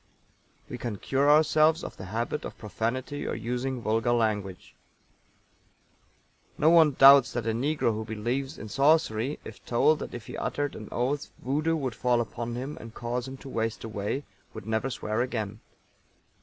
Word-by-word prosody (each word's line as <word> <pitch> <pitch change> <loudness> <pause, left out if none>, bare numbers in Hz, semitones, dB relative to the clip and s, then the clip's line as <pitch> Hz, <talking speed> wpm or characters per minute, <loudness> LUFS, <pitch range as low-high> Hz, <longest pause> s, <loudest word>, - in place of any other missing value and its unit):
We 125 - -7
can 115 -4 -4
cure 140 +7 +1
ourselves 155 +2 +4
of - - -7
the 95 - -9
habit 115 +9 -3
of - - -7
profanity 120 +6 -3
or - - -2
using 125 +1 -3
vulgar 115 +2 +1
language. 105 -5 -1 1.8
No 155 +2 +4
one 160 -4 +6
doubts 135 0 +8
that 120 -2 -2
a 115 - +1
negro 125 +1 0
who 110 +1 -3
believes 120 +7 -3
in 110 - -8
sorcery, 135 -1 +2
if 110 - -11
told 150 +6 +3
that - - -6
if 120 -2 -8
he - - -8
uttered 145 -1 -2
an 110 - -8
oath, 135 +4 -1
Voodoo 150 +5 0
would 135 -6 -2
fall 125 +1 +1
upon 120 0 -4
him 135 +4 -5
and 115 0 -11
cause 120 +1 -3
him 135 0 -7
to - - -7
waste 115 -2 -2
away, 110 +5 -3 0.3
would 110 -3 -8
never 110 +4 -1
swear 115 -2 -2
again. 110 -4 -3
120 Hz, 170 wpm, -28 LUFS, 110-140 Hz, 1.8 s, doubts